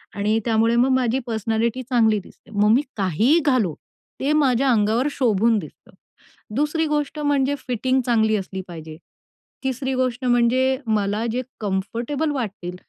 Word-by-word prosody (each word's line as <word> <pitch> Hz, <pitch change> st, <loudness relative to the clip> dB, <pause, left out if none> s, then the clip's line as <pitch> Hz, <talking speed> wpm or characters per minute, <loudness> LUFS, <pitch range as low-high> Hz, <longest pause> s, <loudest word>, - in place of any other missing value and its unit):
आणि 210 Hz, +2 st, +1 dB
त्यामुळे 230 Hz, 0 st, +2 dB
मग 250 Hz, +3 st, +3 dB
माझी 255 Hz, 0 st, +1 dB
पर्सनॅलिटी 225 Hz, +2 st, -1 dB
चांगली 225 Hz, -4 st, +2 dB
दिसते. 220 Hz, -, -18 dB
मग 210 Hz, 0 st, +2 dB
मी 265 Hz, -, +4 dB, 0.2 s
काहीही 210 Hz, -, +3 dB
घालो 235 Hz, -, +2 dB, 0.5 s
ते 280 Hz, +3 st, 0 dB
माझ्या 270 Hz, -3 st, +2 dB
अंगावर 225 Hz, +4 st, +2 dB
शोभून 230 Hz, -3 st, +2 dB
दिसतं. -, -, -12 dB, 0.6 s
दुसरी 300 Hz, +3 st, 0 dB
गोष्ट 295 Hz, 0 st, -2 dB
म्हणजे 285 Hz, -1 st, +1 dB
फिटिंग 255 Hz, +1 st, 0 dB
चांगली 220 Hz, -3 st, +2 dB
असली 190 Hz, -1 st, -4 dB
पाहिजे. 160 Hz, -2 st, -9 dB, 0.7 s
तिसरी 265 Hz, 0 st, -2 dB
गोष्ट 255 Hz, +1 st, -3 dB
म्हणजे 250 Hz, +2 st, +3 dB
मला 210 Hz, +1 st, 0 dB
जे 250 Hz, +2 st, -1 dB, 0.2 s
कम्फर्टेबल 230 Hz, +10 st, -2 dB
वाटतील 195 Hz, -9 st, -4 dB
235 Hz, 140 wpm, -22 LUFS, 215-265 Hz, 0.7 s, मी